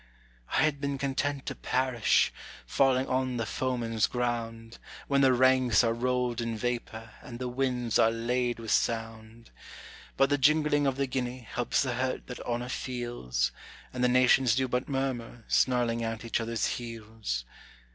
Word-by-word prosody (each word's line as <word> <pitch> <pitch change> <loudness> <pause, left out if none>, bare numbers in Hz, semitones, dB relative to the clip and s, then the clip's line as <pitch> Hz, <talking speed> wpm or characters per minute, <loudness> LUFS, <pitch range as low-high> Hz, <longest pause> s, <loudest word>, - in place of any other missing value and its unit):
I - - +3
had 150 -2 +1
been 140 -1 -1
content 140 +1 -2
to - - -3
perish, 125 -3 +1 0.3
falling 130 - +2
on 130 -1 -1
the 115 - -1
foeman's 115 -2 0
ground, 115 -2 -3 0.3
When 140 -1 +3
the 135 -1 +6
ranks 130 -3 +4
are 115 -1 +2
rolled 125 0 0
in 115 -1 -3
vapor, 115 -1 -4
and 120 -4 -9
the 125 +1 -4
winds 125 -2 0
are 115 - +6
laid 120 +2 -1
with 115 -2 -5
sound. 115 0 -2 0.7
But 135 0 +3
the 145 - +2
jingling 150 0 +3
of 135 - +1
the 140 +1 0
guinea 125 -1 -3
helps 120 +2 -1
the 130 -2 -1
hurt 130 +1 -2
that 125 - -8
honor 120 +1 -2
feels, 120 - -2 0.4
And 125 -1 -2
the 125 - +4
nations 125 -1 +4
do 130 0 +1
but 125 +2 -2
murmur, 130 -4 -3
snarling 120 -2 +2
at 115 0 -4
each 115 - -1
other's 115 -1 -1
heels. 110 - -4
125 Hz, 160 wpm, -29 LUFS, 115-130 Hz, 0.7 s, the